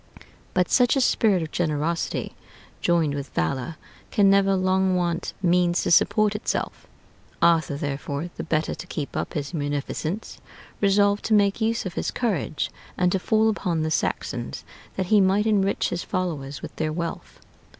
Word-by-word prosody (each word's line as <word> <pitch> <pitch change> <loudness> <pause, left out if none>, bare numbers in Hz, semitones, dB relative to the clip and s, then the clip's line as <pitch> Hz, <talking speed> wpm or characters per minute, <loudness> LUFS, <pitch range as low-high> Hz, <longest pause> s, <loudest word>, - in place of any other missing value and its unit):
But 180 -1 +2
such 245 +1 +4
a - - +2
spirit 210 -8 +3
of 155 - -7
generosity, 160 0 -1 0.5
joined 165 -4 +2
with 140 -2 -5
valor, 125 - -1 0.3
can 200 -1 +4
never 195 0 +4
long 185 0 +2
want 175 -1 -1
means 175 0 +3
to - - 0
support 215 +4 +4
itself. 210 - -3 0.5
Arthur, 165 -4 +3
therefore, 145 +3 -4
the - - -5
better 155 0 0
to 180 - -8
keep 150 -5 -5
up - - -3
his 145 +1 -3
munificence, 150 +5 -3 0.4
resolved 200 0 +3
to 220 - +3
make 200 +1 +2
use 225 0 0
of 185 - -4
his - - -2
courage, 195 - -2 0.3
and 180 0 +2
to 190 - +1
fall 220 +3 +2
upon 180 -7 0
the 155 - -1
Saxons, - - -2 0.3
that 190 - -1
he 210 - +7
might 195 +2 +3
enrich 200 -3 +1
his 175 - -3
followers 145 -7 -3
with - - -8
their 155 -1 -1
wealth. 170 +1 -5
180 Hz, 160 wpm, -24 LUFS, 155-200 Hz, 0.5 s, he